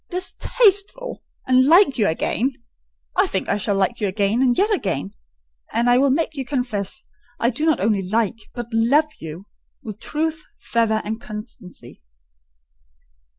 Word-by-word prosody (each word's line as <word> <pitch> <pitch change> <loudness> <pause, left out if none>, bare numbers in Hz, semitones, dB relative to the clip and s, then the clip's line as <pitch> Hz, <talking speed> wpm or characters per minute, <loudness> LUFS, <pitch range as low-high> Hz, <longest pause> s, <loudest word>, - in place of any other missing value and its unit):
"Distasteful! 400 +5 +1 0.2
and 255 +1 +4
like 330 -5 +5
you 205 - +3
again! 245 +10 0 0.6
I 380 +2 +3
think 190 - -2
I - - +1
shall 205 0 0
like 195 +5 0
you 205 - +1
again, 200 +4 0
and 250 -2 +3
yet 420 +3 +3
again: 170 - -2 0.6
and 235 +1 +1
I 245 - +5
will 275 +1 +4
make 315 +4 0
you 275 -3 -4
confess 250 -3 -2 0.4
I 235 - +2
do 300 +7 -2
not 315 - +3
only 205 -1 +1
like, 220 +3 -2
but 240 -1 -4
love 280 +8 +3
you—with 190 +5 -11
truth, 315 +3 -2
fervour, 220 -2 0 0.2
constancy." 210 -5 -10
240 Hz, 145 wpm, -21 LUFS, 210-305 Hz, 0.6 s, like